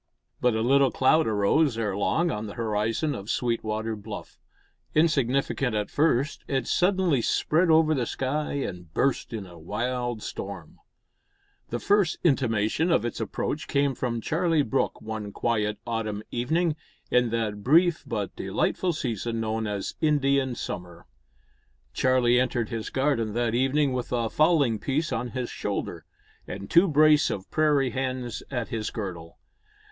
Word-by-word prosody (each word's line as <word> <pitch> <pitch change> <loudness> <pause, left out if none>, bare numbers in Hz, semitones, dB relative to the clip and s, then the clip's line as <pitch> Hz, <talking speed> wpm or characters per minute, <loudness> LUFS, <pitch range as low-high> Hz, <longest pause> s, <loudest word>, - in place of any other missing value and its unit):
But 125 -2 +2
a 110 - 0
little 135 +2 +4
cloud 145 +3 +3
arose 110 +6 +2
ere 105 -4 -1
long 165 - +1
on 105 +1 -4
the 100 - -8
horizon 115 +6 -1
of 100 +1 -7
Sweetwater 110 -2 -1
Bluff. 105 +1 -9 0.6
Insignificant 135 -5 +1
at 105 -1 -2
first, 145 -2 +1
it 135 -3 -1
suddenly 180 -7 +2
spread 165 +8 +2
over 160 0 +5
the 125 -5 -1
sky 145 +3 -2
and 90 - -4
burst 135 -2 0
in 110 -4 -5
a 85 -2 -13
wild 120 +5 -3
storm. 95 -5 -7 0.9
The 120 - -2
first 200 - +2
intimation 130 - +2
of 120 - +2
its 120 - -4
approach 145 +7 -3
came 140 -1 +1
from 120 -2 -2
Charlie 165 +2 +1
Brooke 110 - -1
one 110 -2 -5
quiet 105 -1 -1
autumn 110 -3 -3
evening, 160 +7 0 0.4
in 125 -1 +3
that 110 -3 -2
brief 165 - +4
but 105 -4 -3
delightful 180 -2 -1
season 115 -5 -3
known 110 0 -2
as 100 -1 -3
the 155 - +2
Indian 140 -3 +2
Summer. 85 -4 -6 0.9
Charlie 125 -1 +3
entered 120 -3 0
his 115 -2 -4
garden 130 -6 0
that 120 -1 0
evening 135 +3 +2
with 125 -1 -3
a 115 -2 0
fowling 145 -8 +3
piece 145 +1 -1
on 120 +1 -2
his 125 0 -4
shoulder, - - -4 0.4
and 100 0 -7
two 170 +3 +6
brace 155 -1 +5
of 95 - -5
prairie 145 -4 +2
hens 130 -2 -3
at 120 -4 -3
his 110 -2 -3
girdle. 85 -6 -6
120 Hz, 150 wpm, -26 LUFS, 110-145 Hz, 0.9 s, two